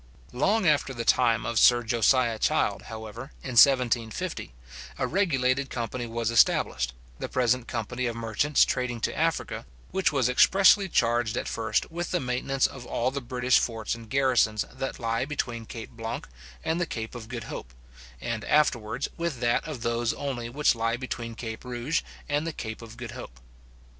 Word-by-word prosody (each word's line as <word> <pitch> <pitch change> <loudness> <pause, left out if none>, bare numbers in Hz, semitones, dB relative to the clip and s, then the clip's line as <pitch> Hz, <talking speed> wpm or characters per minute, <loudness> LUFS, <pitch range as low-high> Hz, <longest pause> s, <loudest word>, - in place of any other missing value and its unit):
Long 195 - +2
after 145 -3 +2
the 115 -1 -4
time 115 -3 +3
of 115 - +1
Sir 120 -1 +6
Josiah 115 0 +2
Child, - - +1
however, 110 +2 -7 0.2
in 130 - -5
1750, 120 - +3 0.5
a - - 0
regulated 140 -8 +1
company 120 0 -4
was 115 0 -2
established, 65 - +3 0.2
the - - -4
present 125 -1 +1
company 120 +3 -3
of 120 - -3
merchants 115 +6 +2
trading 125 -2 -2
to - - -1
Africa; 165 +1 -1 0.3
which 190 -5 +2
was 135 -5 +2
expressly 195 +9 +5
charged 120 -4 +1
at - - -2
first 110 +4 -1
with 175 +1 -3
the 180 - 0
maintenance 130 0 0
of - - -4
all 125 +2 0
the 140 +1 -4
British 125 0 +2
forts 115 -2 -2
and 115 -1 -9
garrisons 125 -5 +2
that 135 - -4
lie 115 -1 -1
between 120 -5 -3
Cape 115 -2 -8
Blanc 115 -1 -5 0.4
and 165 +2 0
the 175 - 0
Cape 110 -5 -5
of 120 -3 -8
Good 115 -2 -5
Hope, - - -7 0.5
and 115 - -3
afterwards 135 -4 +1
with 170 -6 -2
that 120 +5 +1
of 140 -7 -6
those 115 0 0
only 130 -5 -4
which 145 +5 +3
lie 115 0 -1
between 120 -2 -5
Cape 110 -2 -6
Rouge 125 +4 -1 0.3
and 145 +2 0
the 165 - -3
Cape 110 -4 -6
of 115 0 -11
Good 120 -2 -6
Hope. - - -9
120 Hz, 175 wpm, -27 LUFS, 115-135 Hz, 0.5 s, Sir